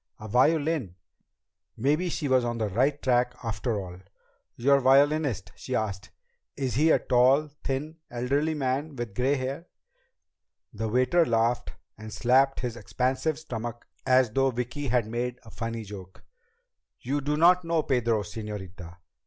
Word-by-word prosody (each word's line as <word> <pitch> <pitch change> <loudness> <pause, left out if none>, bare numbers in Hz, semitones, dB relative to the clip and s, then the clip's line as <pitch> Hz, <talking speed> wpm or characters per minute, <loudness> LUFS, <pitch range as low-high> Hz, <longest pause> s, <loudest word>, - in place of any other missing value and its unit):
A 110 - -8
violin! 140 - +1 0.8
Maybe 150 +9 +1
she 155 -2 -2
was 130 -2 +3
on 120 0 -2
the 110 -2 -1
right 135 +8 +1
track 125 -2 +1
after 110 -1 -2
all! 90 -2 -8 0.6
"Your 140 +3 +4
violinist?" 135 - +3
she 130 - -5
asked. 100 -4 -3 0.5
"Is 135 -3 -2
he 155 +5 +3
a - - +6
tall, 130 +5 +3
thin, 150 +4 -3
elderly 140 +6 0
man 140 +2 -2
with 120 -4 -5
gray 130 +7 +1
hair?" 135 +6 -4 1.1
The 110 +1 -3
waiter 130 +9 +3
laughed 115 -2 0 0.3
and 110 0 -8
slapped 130 +5 +2
his 120 -2 -3
expansive 130 +7 -1
stomach 120 -6 -6 0.2
as 130 -3 +3
though 135 +3 +2
Vicki 125 +4 -4
had 125 -2 +2
made 120 +2 -3
a 110 - -14
funny 115 0 -4
joke. 95 -3 -11 0.8
"You 140 +4 -2
do 150 +2 -1
not 180 +3 +5
know 165 -1 0
Pedro, 115 -5 +1
señorita. 100 -5 -8
125 Hz, 145 wpm, -27 LUFS, 115-140 Hz, 1.1 s, a